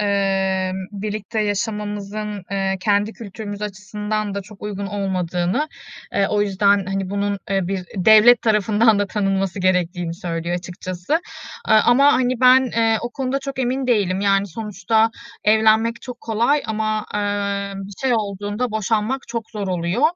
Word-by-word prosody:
eee, 195 -2 +1 0.2
birlikte 210 +2 -3
yaşamımızın, 210 -1 -3
eee, 195 -1 0
kendi 205 +2 +1
kültürümüz 205 -1 -7
açısından 210 0 -3
da 200 - -3
çok 205 +1 -15
uygun 200 -1 -4
olmadığını, 190 - -1 0.4
eee, 200 - +2
o 205 -1 +2
yüzden, 200 -1 +2
hani, 195 -1 -2
bunun 200 0 -1
bir 195 -1 -1
devlet 220 +5 +6
tarafından 215 0 +3
da 205 - +1
tanınması 195 -1 -1
gerektiğini 180 -2 0
söylüyor, 170 -2 -3
açıkçası. 180 - -6 0.5
Aaa, 220 0 +5
ama, 275 +4 +5
hani, 255 -1 +1
ben 255 -1 +6 0.3
o 240 - -3
konuda 265 +1 -2
çok 275 0 -7
emin 260 +1 -1
değilim. 200 -6 +1
Yani, 200 0 +2
sonuçta 220 +2 0 0.3
evlenmek 220 +2 +3
çok 250 -1 -8
kolay 235 +6 +1
ama, 215 -1 -1
ııı, 200 -1 -1
bir 200 - -10
şey 265 -2 +2
olduğunda 205 +2 -2
boşanmak 220 +4 0
çok 230 -2 -5
zor 205 -3 -4
oluyor 180 +6 -1
205 Hz, 140 wpm, -21 LUFS, 195-220 Hz, 0.5 s, devlet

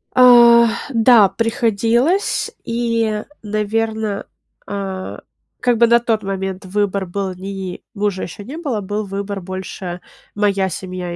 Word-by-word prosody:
А, 240 -2 +8 0.2
да, 230 -4 +5
приходилось, 230 - +1
и, 230 -2 -1 0.2
наверно, 215 0 -2 0.4
а, 195 -2 -5 0.4
как 245 -2 +2
бы 235 +1 +5
на 235 0 +5
тот 225 -3 -1
момент 195 0 -4
выбор 200 0 -1
был 190 +1 -3
ни 190 -1 -6
мужа 200 -2 -2
еще 200 +4 -7
не 275 +9 -8
было, 270 -11 -2
был 205 +2 -3
выбор- 200 +1 -4
больше 185 -1 -6 0.3
моя 200 -2 +1
семья. 180 0 -5
205 Hz, 125 wpm, -19 LUFS, 190-230 Hz, 0.4 s, А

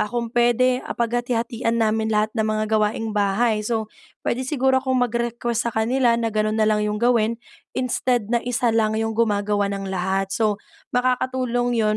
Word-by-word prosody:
ah, 210 - 0
kung 235 0 -3
puwede, 245 +1 +3
ah, - - -4
paghati-hatian 235 0 -1
namin 220 -1 +1
lahat 215 0 +1
ng 220 -2 0
mga 215 0 0 0.2
gawaing 215 +1 -1
bahay. 210 +2 +1
So, 220 0 -3 0.3
puwede 245 - -1
siguro 265 -2 +2
akong 260 -1 0
mag-request 235 0 -2
sa - - -4
kanila 235 +1 +2
na 230 -2 -1
ganun 215 0 0
na 220 - +3
lang 215 0 +2
'yong 210 0 -1
gawin 235 -1 +2 0.4
instead 250 -2 0
na 235 - +3
isa 245 -1 0
lang 220 -1 +1
'yong 225 0 -1
gumagawa 205 -2 +1
ng 195 0 -4
lahat. 190 +1 -1
So, 215 -2 +1 0.4
makakatulong 250 -1 0
yun 215 -1 +2
230 Hz, 175 wpm, -22 LUFS, 215-240 Hz, 0.4 s, puwede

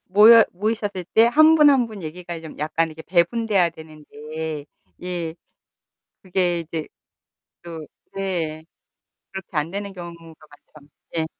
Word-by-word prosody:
모여 220 +4 +8
모이셨을 205 -1 -3
때 225 +1 +6
한 310 +6 +6
분, 300 -2 +7
한 260 -4 +3
분 215 -3 -10
얘기가 170 +1 -7
좀 160 - -11
약간 160 +2 0
이렇게 160 0 -10
배분돼야 190 +1 +2
되는데. 155 -1 -8 0.4
예. 175 -2 -4 0.9
그게 180 -2 0
이제 165 -1 -5 0.8
또 165 -3 -8 0.3
네 170 -5 -3 0.7
그렇게 190 -3 -8
안 150 +2 0
되는 200 +1 -5
경우가 175 -2 -8 0.6
많죠. 145 -1 -17 0.3
예. 160 -1 0
175 Hz, 240 characters per minute, -22 LUFS, 160-205 Hz, 0.9 s, 모여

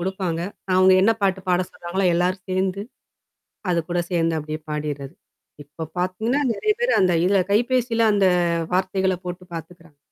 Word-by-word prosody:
கொடுப்பாங்க. 185 -2 -2 0.3
அவங்க 185 0 +6
என்ன 225 +3 +5
பாட்டு 190 -1 +1
பாட 180 0 +3
சொல்றாங்களோ, 180 +3 -3
எல்லாரும் 180 +2 0
சேர்ந்து, 190 +1 -1 0.9
அதுக்கூட 175 0 0
சேர்ந்து 165 -2 +1
அப்படியே 155 +1 -5
பாடிறது. 150 -1 -4 0.5
இப்போ 150 +3 -10 0.2
பார்த்தீங்கன்னா, 215 +10 0
நிறைய 430 - +1
பேர் 485 +1 +2
அந்த 185 -2 +3
இதில, 195 +1 +3
கைபேசியில 235 0 +2
அந்த 200 -2 +3 0.5
வார்த்தைகளை 190 0 +1
போட்டு 180 +1 -6
பார்த்துக்கிறாங்க. 165 -1 -10
185 Hz, 135 wpm, -22 LUFS, 170-195 Hz, 0.9 s, அவங்க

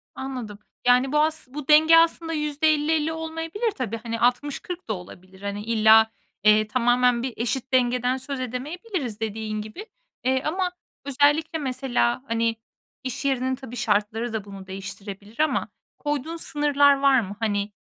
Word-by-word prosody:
Anladım. 250 -6 -6 0.3
Yani 250 +2 +4
bu 300 - +3
as 310 -2 0
bu 290 0 -7
denge 315 +2 +7
aslında 330 0 +2
%50-50 305 +1 +1
olmayabilir 325 +7 -3
tabii. 240 - -4
Hani, 230 0 -5
60-40 290 +7 -1
da 215 - +1
olabilir. 185 +1 -11
Hani 200 0 -4
illa, 220 0 +5 0.3
eee, 215 0 +5
tamamen 245 +1 +2
bir 260 - -3
eşit 255 +3 -2
dengeden 250 0 +2
söz 270 +1 -5
edemeyebiliriz, 260 - -4
dediğin 215 -1 -3
gibi. 215 - -8 0.4
Eee, 260 +1 +1
ama 360 +3 -1 0.3
özellikle 290 +4 +2
mesela, 245 - 0
hani, 230 0 0 0.5
iş 260 +1 -4
yerinin, 260 -1 +1
tabii, 260 -2 -10
şartları 220 +1 0
da 220 -3 -2
bunu 195 -1 -10
değiştirebilir 195 +3 -8
ama 310 0 +1 0.3
koyduğun 295 +2 -3
sınırlar 290 -2 +3
var 275 -1 +5
mı 205 -2 -5
hani? 205 -2 -1
255 Hz, 145 wpm, -24 LUFS, 220-295 Hz, 0.5 s, denge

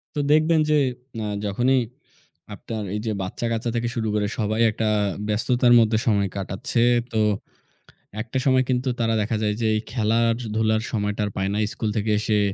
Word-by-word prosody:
তো - - -1
দেখবেন 155 +2 +4
যে 155 - +4 0.5
আ - - -3 0.2
যখনই 120 +6 +2 0.8
আপনার 110 -2 -6
এই - - -1
যে 110 - 0
বাচ্চাকাচ্চা 115 +5 -2
থেকে 120 0 0
শুরু 115 -2 -1
করে 105 -1 +1
সবাই 110 +1 0
একটা 110 - -2 0.4
ব্যস্ততার 120 +3 +3
মধ্যে 110 -1 +3
সময় 100 -3 +3
কাটাচ্ছে। 95 +3 -3 0.3
তো - - 0 1.1
একটা 120 +3 -3
সময় 130 -1 +4
কিন্তু 125 +1 0
তারা 115 -1 +1
দেখা 110 +2 -1
যায় 105 -1 +1
যে - - +2
এই 110 - +1
খেলার-ধুলার 110 -1 +1
সময়টা 105 -1 -1
আর - - -4
পায় 95 0 0
না। - - -1
স্কুল 110 - -2
থেকে 105 +1 -1
এসে 105 -1 +1
110 Hz, 170 wpm, -23 LUFS, 105-120 Hz, 1.1 s, দেখবেন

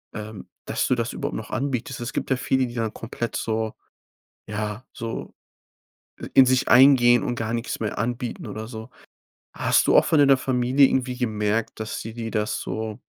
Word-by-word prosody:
ähm, 105 0 -8 0.2
dass - - -1
du - - +2
das - - -2
überhaupt - - -4
noch - - -8
anbietest. 135 -2 -2
Es 120 +1 -5
gibt - - -3
ja - - +4
viele, 130 0 +1
die 120 - -7
dann 115 -2 -2
komplett 115 +1 -5
so 110 -1 -2 0.7
ja, 105 +2 -4
so 115 0 -6 1.0
in 130 - +7
sich 130 0 +2
eingehen 125 -2 +6
und 120 - -2
gar 115 -1 -3
nix 120 0 -3
mehr 105 - -3
anbieten 120 +2 -3
oder 110 +1 -6
so. 110 -1 -8 0.7
Hast - - +2
du - - +3
auch - - +5
von 155 - +3
deiner 140 -2 +6
Familie 130 +1 +3
irgendwie 125 -1 -1
gemerkt, 110 -2 -1
dass 110 - -4
die 115 0 -7
dir 115 -1 -5
das 105 -1 -1
so 110 -1 -4
120 Hz, 185 wpm, -24 LUFS, 110-130 Hz, 1.0 s, in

